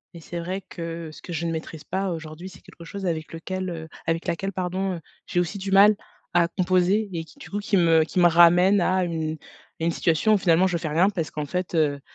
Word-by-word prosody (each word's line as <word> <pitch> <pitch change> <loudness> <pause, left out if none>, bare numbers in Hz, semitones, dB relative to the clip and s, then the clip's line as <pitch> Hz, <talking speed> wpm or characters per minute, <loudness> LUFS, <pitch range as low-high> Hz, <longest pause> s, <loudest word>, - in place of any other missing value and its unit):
et 170 - -9
c'est 170 +2 -6
vrai 185 +3 -4
que, 165 -3 -7
ce - - -13
que 175 - -7
je 170 +1 -2
ne 165 - -1
maîtrise 160 -1 -6
pas 190 +1 -2
aujourd'hui, 160 +2 -7
c'est 180 - -15
quelque 170 - -14
chose 195 +3 -6
avec 160 -3 -2
lequel 185 +3 -4
heu, 160 -2 -6 0.2
avec 165 0 -1
laquelle, 195 +4 -2
pardon, 185 +1 -2
heu, 170 - -7 0.3
j'ai 175 - 0
aussi 180 +3 -2
du 195 0 -4
mal 205 +2 +7 0.4
à 170 -1 +4
composer 185 +4 +1
et 165 -1 -3
qui, 280 - -19
du - - -11
coup, 205 - -2
qui 205 -1 +1
me 165 -2 +5
qui 160 - -7
me 175 - +7
ramène 175 +3 +6
à 185 +1 +2
une 160 -2 -2 0.4
à 165 - -4
une 170 - +2
situation 170 +6 +2
où - - +5
finalement, 175 0 +4
je 180 -2 0
fais 160 - -4
rien 170 +6 +3
parce 165 -5 -3
qu'en 150 -1 -4
fait, 180 +4 -3
heu 145 -3 +2
175 Hz, 245 wpm, -24 LUFS, 165-190 Hz, 0.4 s, mal